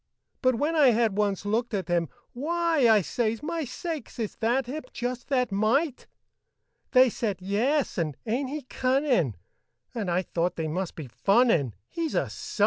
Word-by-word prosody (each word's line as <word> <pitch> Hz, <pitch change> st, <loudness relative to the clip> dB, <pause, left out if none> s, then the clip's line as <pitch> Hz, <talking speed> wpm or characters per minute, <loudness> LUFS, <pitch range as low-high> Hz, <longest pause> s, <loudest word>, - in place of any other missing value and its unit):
But 255 Hz, -2 st, +3 dB
when 295 Hz, +7 st, 0 dB
I 300 Hz, -4 st, +6 dB
had 230 Hz, -4 st, +3 dB
once 205 Hz, -2 st, 0 dB
looked 225 Hz, +2 st, 0 dB
at 195 Hz, -1 st, -2 dB
him, 170 Hz, -3 st, +1 dB, 0.2 s
"Why!" 320 Hz, -1 st, +2 dB
I 215 Hz, -3 st, +5 dB
says, 225 Hz, -, -1 dB
"My 330 Hz, 0 st, -2 dB
sakes, 315 Hz, +4 st, -6 dB
is 225 Hz, -3 st, -3 dB
that 240 Hz, +3 st, +1 dB
him? 285 Hz, +6 st, -4 dB
Just 245 Hz, 0 st, -4 dB
that 250 Hz, -5 st, +1 dB
mite!" 245 Hz, +8 st, +1 dB, 0.8 s
They 255 Hz, 0 st, +6 dB
said, 215 Hz, -4 st, -2 dB
"Yes," 225 Hz, +8 st, 0 dB
and, 155 Hz, -5 st, -2 dB
"Ain't 255 Hz, +4 st, -1 dB
he 300 Hz, +1 st, -4 dB
cunnin'?" 255 Hz, -, +1 dB, 0.6 s
And 220 Hz, -6 st, -3 dB
I 175 Hz, +2 st, +1 dB
thought 175 Hz, 0 st, -1 dB
they 160 Hz, -1 st, -2 dB
must 180 Hz, +3 st, -3 dB
be 155 Hz, -, -6 dB
funnin', 170 Hz, -, +2 dB
He's 330 Hz, -2 st, -3 dB
a -, -, +3 dB
_sight! -, -, -8 dB
235 Hz, 170 wpm, -27 LUFS, 195-270 Hz, 0.8 s, I